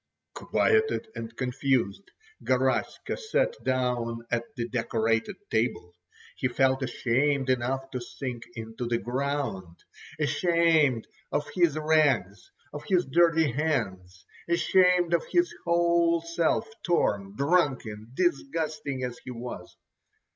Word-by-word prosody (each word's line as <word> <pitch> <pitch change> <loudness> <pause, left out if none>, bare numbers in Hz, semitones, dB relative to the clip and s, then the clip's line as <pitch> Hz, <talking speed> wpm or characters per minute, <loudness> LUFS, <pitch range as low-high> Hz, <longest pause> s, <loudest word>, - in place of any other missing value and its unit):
Quieted 435 - +1
and 115 0 -7
confused, 130 - -1 0.3
Garaska 130 0 0
sat - - 0
down 120 -2 -1
at 120 0 0
the 120 -3 -3
decorated 115 - 0 0.2
table. 110 -6 -1 0.4
He 130 - +1
felt 130 +1 +2
ashamed 130 +2 +1
enough 130 +2 -1
to 125 - -4
sink 120 -1 -6
into 115 +1 -5
the 120 0 +1
ground. 125 -9 -3 0.4
Ashamed 155 -4 +3 0.3
of 145 - -1
his 170 -3 +2
rags, 140 - +2 0.2
of 150 - -6
his 180 -2 +2
dirty 165 0 +3
hands, 95 - -2 0.2
ashamed 175 0 +3
of 170 - +3
his 350 0 +2
whole 170 -1 +3
self, 170 +6 0
torn, 100 - 0
drunken, 135 -8 0
disgusting 155 -4 -1
as 125 -1 -4
he - - -9
was. 125 0 -8
135 Hz, 110 wpm, -27 LUFS, 120-165 Hz, 0.4 s, Ashamed